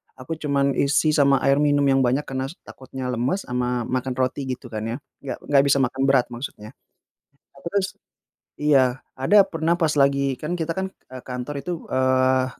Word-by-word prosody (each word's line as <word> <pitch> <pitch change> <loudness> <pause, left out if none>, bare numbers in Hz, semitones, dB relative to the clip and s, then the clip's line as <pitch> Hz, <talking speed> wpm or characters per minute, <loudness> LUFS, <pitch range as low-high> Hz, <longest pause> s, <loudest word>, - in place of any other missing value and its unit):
aku 155 +5 -6
cuman 140 -2 +1
isi 140 +3 +2
sama 140 -2 +3
air 135 +1 +3
minum 145 -1 +3
yang 135 -1 +3
banyak 130 +3 +2
karena 130 -1 -3
s 150 - -10
takutnya 130 -1 -7
lemes 125 +11 -1
ama 125 0 -1
makan 130 +2 -2
roti 130 +2 -1
gitu 125 -1 -6
kan 110 0 -4
ya, 115 - -3 0.2
nggak 135 - -7
nggak 140 -1 +4
bisa 140 - +4
makan 135 +2 0
berat 135 -3 +4
maksudnya. 120 -3 -7 0.9
Aku - - -18
tus 200 -1 -1 0.6
iya, 135 -4 +3 0.2
ada 195 +10 +4
pernah 165 -2 0
pas 160 -3 +1
lagi 140 -1 +2
kan 175 +4 -2
kita 165 0 -2
kan 190 +2 -3
e 130 -8 -17
kantor 130 +3 -5
itu, 175 0 -5
eee, 130 0 +2
135 Hz, 180 wpm, -23 LUFS, 130-150 Hz, 0.9 s, nggak